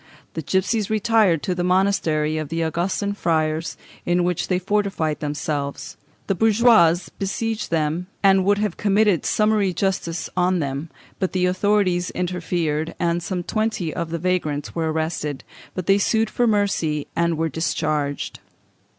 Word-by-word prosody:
The 160 - -3
gipsies 190 +6 0
retired 215 -7 +3
to 185 - 0
the 175 0 -2
monastery 170 -5 +1
of 155 -2 -5
the 165 +1 -1
Augustin 175 +5 -1
friars, 160 -3 -1 0.3
in 175 0 +1
which 175 -1 -1
they 180 - +1
fortified 190 -5 -1
themselves: 145 -1 -3 0.3
the - - +1
bourgeois 220 -4 +5 0.2
besieged 215 +2 -2
them, 165 +2 -1 0.2
and 195 -1 +5
would 200 +2 +3
have 210 -3 -1
committed 205 -3 +2
summary 210 -3 +2
justice 175 -3 -1
on 180 0 +2
them, 140 0 -3 0.3
but 190 - -1
the 185 -1 +2
authorities 185 -1 +1
interfered, 170 -3 -2
and 170 0 0
some 180 0 -3
twenty 215 -6 -1
of 170 -2 -3
the 170 - -2
vagrants 155 -5 -1
were 160 -1 -1
arrested, 155 -3 -3 0.3
but 185 - -3
they 195 +2 +4
sued 220 +1 +1
for 245 - +1
mercy, 195 -8 +1
and 170 -1 +1
were 165 +1 +1
discharged. 150 -2 -2
180 Hz, 150 wpm, -22 LUFS, 160-200 Hz, 0.3 s, bourgeois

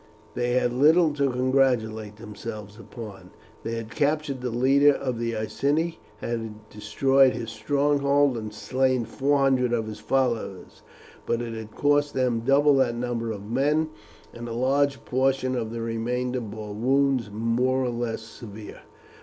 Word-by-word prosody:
They 120 0 -1
had 125 -1 +1
little 155 +4 +4
to 140 -1 +1
congratulate 125 -5 +1
themselves 105 -1 -8
upon. 105 -5 -10 0.3
They 115 - -4
had 115 -1 -6
captured 145 -1 0
the 125 - -2
leader 135 +4 +4
of 125 -4 -3
the 115 -1 -2
Iceni, 145 +9 -1 0.2
had 110 -2 -5
destroyed 135 +5 +3
his 115 -1 -5
stronghold 140 +3 +2
and 110 -2 -5
slain 130 +3 0
four 140 +5 +1
hundred 130 -3 +2
of 115 -2 0
his 110 -1 -7
followers, 120 -8 -2 0.5
but 115 - +1
it 120 -1 -4
had 110 -1 -8
cost 145 0 +2
them 125 -3 +1
double 140 +4 +4
that 125 -3 +2
number 120 -1 -2
of 100 -2 -7
men, 150 +5 +1 0.4
and 120 0 -7
a - - -4
large 135 0 +1
portion 130 0 +1
of 115 -3 -2
the 115 0 -4
remainder 125 +2 -2
bore 105 -1 -7
wounds 130 +1 +1
more 120 +4 +1
or 125 - 0
less 120 -2 -3
severe. 110 -1 -10
125 Hz, 155 wpm, -25 LUFS, 115-135 Hz, 0.5 s, little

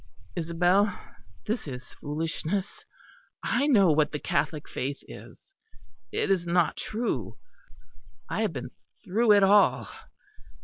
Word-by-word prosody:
"Isabel, 180 +4 +2 0.5
this 220 -5 -2
is 125 -3 -8
foolishness. 165 +6 -3 0.6
I 285 - +1
know 200 - +5
what 150 0 +2
the 150 - -2
Catholic 150 +1 -1
faith 140 +2 -3
is. 390 - -13 0.6
It - - 0
is 175 -3 +1
not 170 -1 +2
true; 210 - -3 0.9
I 195 - -2
have 210 -6 0
been 125 -2 -6 0.3
through 215 +3 +4
it 200 -1 +5
all." 200 +1 +4
175 Hz, 120 wpm, -27 LUFS, 150-205 Hz, 0.9 s, know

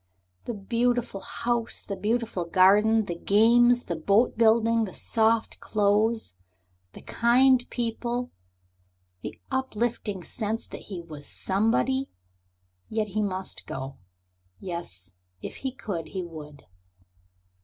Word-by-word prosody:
The 240 - -3
beautiful 235 +1 0
house, 235 +3 -2
the 200 - -4
beautiful 220 -1 -1
garden, 205 +5 +5
the 175 - -3
games, 235 +7 +4
the 170 - -3
boat 200 +9 +2
building, 230 0 +4
the 190 - -9
soft 225 0 +1
clothes, 210 - +1 0.6
the - - -12
kind 250 +2 +3
people, 240 +1 -2 0.9
the - - -7
uplifting 235 -6 -2
sense 220 +4 -3
that - - -9
he 190 -4 -5
was 150 -3 -10
Somebody... 135 - +1 0.8
yet 215 -1 -1
he 215 +2 -1
must 190 -2 -3
go. 135 +1 -6 0.6
Yes, 90 - -6 0.3
if - - -6
he 265 - -3
could 200 -10 -5
he 190 -2 -4
would. 150 -4 -10
215 Hz, 115 wpm, -27 LUFS, 185-235 Hz, 0.9 s, garden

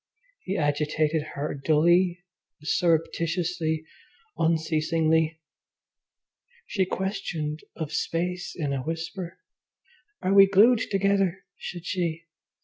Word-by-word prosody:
He 195 +2 -3
agitated 150 +1 +1
her 145 +2 -2
dully, 170 +5 +3 0.4
surreptitiously, 165 0 0 0.5
unceasingly. 160 0 +1 1.3
She 190 -3 0
questioned 180 -6 -3 0.2
of 160 -2 -5
space 175 +3 -2
in 145 -5 -2
a 135 - -1
whisper, 165 +4 -5 0.9
"Are 185 +1 +2
we 195 0 +8
glued 215 +5 +6
together?" 195 -2 +1 0.2
said 175 -1 -7
she. 170 -3 -2
165 Hz, 90 wpm, -26 LUFS, 155-185 Hz, 1.3 s, we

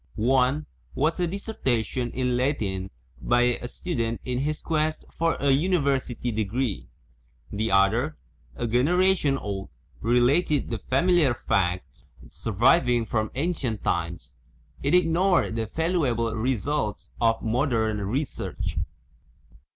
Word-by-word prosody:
One 130 +5 +2 0.3
was 155 +5 +1
a 175 - +1
dissertation 130 - -2
in 125 0 -1
Latin 105 -8 -1 0.3
by 120 - +3 0.2
a 120 - -4
student 115 -7 -3
in 125 -1 -1
his 150 +3 -1
quest 155 -1 -1
for 165 0 +1
a 140 0 +1
university 140 -6 +1
degree; 110 +1 -2 0.6
the 110 +2 -1
other, 110 +10 +2 0.4
a - - -3
generation 150 +5 +2
old, 100 -5 -5 0.3
related 130 - +2
the 115 - -2
familia 165 - +3
r 125 - +2
facts 95 -4 0
ui - - -28
iv - - -33
PREFACE - - -24
surviving 120 - +3
from 110 0 -1
ancient 135 - -2
times; 85 -5 -2 0.5
it 140 +5 +2
ignored 180 - +3
the 115 -1 -2
valu 165 - 0
able 115 -1 -1
results 120 0 -2
of 115 -1 +2
modern 115 -3 +1
research. 130 +9 -3
125 Hz, 130 wpm, -26 LUFS, 110-155 Hz, 0.6 s, by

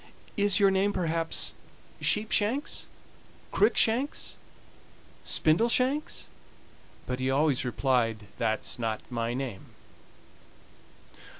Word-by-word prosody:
"Is 200 -1 +3
your 200 -1 +5
name, 195 +2 +2
perhaps, 165 -2 -1 0.5
Sheepshanks 220 +5 +1 0.7
Cruickshanks, 250 +6 +2 0.9
Spindleshanks?" 245 - +2 0.8
but 125 0 -3
he 130 0 0
always 140 -1 +2
replied: 120 -4 0
"That's 110 +1 -1
not 110 -2 -2
my 115 0 -1
name." 125 -7 -5
160 Hz, 80 wpm, -28 LUFS, 125-205 Hz, 0.9 s, your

